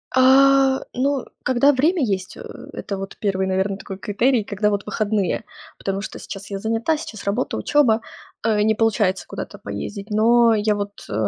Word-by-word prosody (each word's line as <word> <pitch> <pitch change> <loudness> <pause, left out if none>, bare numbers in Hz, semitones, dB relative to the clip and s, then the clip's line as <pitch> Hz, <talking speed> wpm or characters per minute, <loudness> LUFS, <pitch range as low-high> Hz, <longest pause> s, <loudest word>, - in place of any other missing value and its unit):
А, 270 +1 +5
ну, 270 +1 0 0.2
когда 260 +3 +4
время 305 +5 +2
есть. 190 -5 -2
Э, - - -9 0.3
это, 200 - -5
вот, 195 0 -7
первый, 190 -2 0
наверно, 190 +1 0
такой 195 -1 -8
критерий, 230 +4 +1
когда, 205 +1 0
вот, 200 0 -2
выходные. 210 -2 -1 0.3
Потому 195 0 -3
что - - -7
сейчас 195 0 -8
я 200 - -3
занята, 225 +9 0
сейчас 220 -8 -8
работа, 205 +6 -1
учёба, 245 -7 +3 0.4
э, 215 -2 +2
не 220 +1 +3
получается 210 -3 +1
куда-то - - -7
поездить. 205 0 -6
Но 230 +2 +4
я 210 0 +1
вот, 205 0 -5
э, - - -5
215 Hz, 170 wpm, -21 LUFS, 200-255 Hz, 0.4 s, А